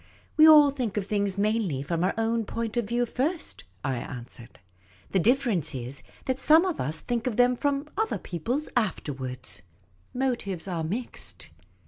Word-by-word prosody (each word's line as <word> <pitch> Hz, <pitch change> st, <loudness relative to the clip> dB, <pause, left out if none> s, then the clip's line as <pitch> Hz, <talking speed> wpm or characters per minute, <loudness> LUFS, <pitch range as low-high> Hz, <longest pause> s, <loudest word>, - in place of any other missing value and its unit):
" -, -, -33 dB
We 310 Hz, 0 st, +8 dB
all 300 Hz, -2 st, +9 dB
think 245 Hz, -7 st, -3 dB
of 200 Hz, -, 0 dB
things 200 Hz, -1 st, 0 dB
mainly 205 Hz, -9 st, 0 dB
from 165 Hz, +3 st, -1 dB
our 185 Hz, -, +1 dB
own 225 Hz, 0 st, +1 dB
point 230 Hz, +1 st, -3 dB
of 240 Hz, -2 st, +1 dB
view 240 Hz, +3 st, 0 dB
first," 300 Hz, +8 st, -2 dB, 0.2 s
I 130 Hz, -2 st, -1 dB
answered. 120 Hz, -1 st, -9 dB, 0.3 s
" 95 Hz, -1 st, -29 dB
The 190 Hz, -, +3 dB
difference 215 Hz, -, +2 dB
is 130 Hz, +2 st, -4 dB, 0.2 s
that 260 Hz, 0 st, -1 dB
some 315 Hz, +5 st, +6 dB
of 365 Hz, -4 st, -2 dB
us 155 Hz, +4 st, -2 dB
think 240 Hz, 0 st, -2 dB
of 230 Hz, -, -2 dB
them 250 Hz, 0 st, +5 dB
from 285 Hz, +3 st, -1 dB
other 440 Hz, +2 st, 0 dB
people's 240 Hz, -, -3 dB
afterwards. 135 Hz, -, -2 dB, 0.5 s
Motives 235 Hz, -9 st, -2 dB
are 170 Hz, -3 st, -2 dB
mixed." 220 Hz, +10 st, -4 dB
220 Hz, 170 wpm, -27 LUFS, 160-255 Hz, 0.5 s, all